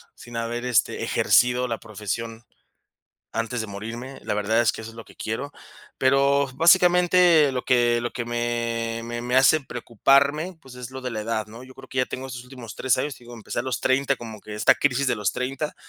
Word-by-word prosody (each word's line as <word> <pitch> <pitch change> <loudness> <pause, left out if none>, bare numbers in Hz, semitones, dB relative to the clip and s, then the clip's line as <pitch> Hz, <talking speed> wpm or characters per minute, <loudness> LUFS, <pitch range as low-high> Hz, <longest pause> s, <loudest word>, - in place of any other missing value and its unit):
sin 120 -1 -12
haber, 115 +1 -3
este, 125 -2 +1
ejercido 125 +1 +3
la 115 -2 -3
profesión 110 +2 -5 0.9
antes 115 +2 -2
de 110 - -3
morirme. 115 +6 -7
La - - -2
verdad 105 +3 +1
es 115 - +3
que - - -9
eso 115 0 -8
es - - -17
lo 115 - -9
que - - -18
quiero. 115 +6 -4 0.5
Pero, 140 +1 +3
básicamente, 175 -1 +5
lo 125 -1 -3
que 120 -1 +3
lo 120 - -3
que 120 - -3
me 115 -1 -2
me 120 0 -5
me 125 +1 -1
hace 135 +4 +6
preocuparme, 140 - +1
pues, 130 -4 -13
es 125 0 -8
lo 130 0 -7
de 125 -1 -4
la 110 - -4
edad, 110 0 -2
¿no? 115 +3 -11
Yo 130 0 -14
creo 130 0 -14
que 130 - -7
ya 125 - +3
tengo 130 +1 -6
estos 125 -1 -8
últimos 125 -4 -10
3 130 -2 +2
años, 135 +2 -2
te 120 - -18
digo, 120 - -11
empecé 115 0 -5
a - - +1
los 130 -2 -3
30, 135 +1 +2
como 110 -3 -9
que 105 +1 -9
esta 105 - +4
crisis 140 0 +1
de 125 - +2
los 100 -3 -1
30, 135 +4 -3
125 Hz, 220 wpm, -24 LUFS, 115-135 Hz, 0.9 s, hace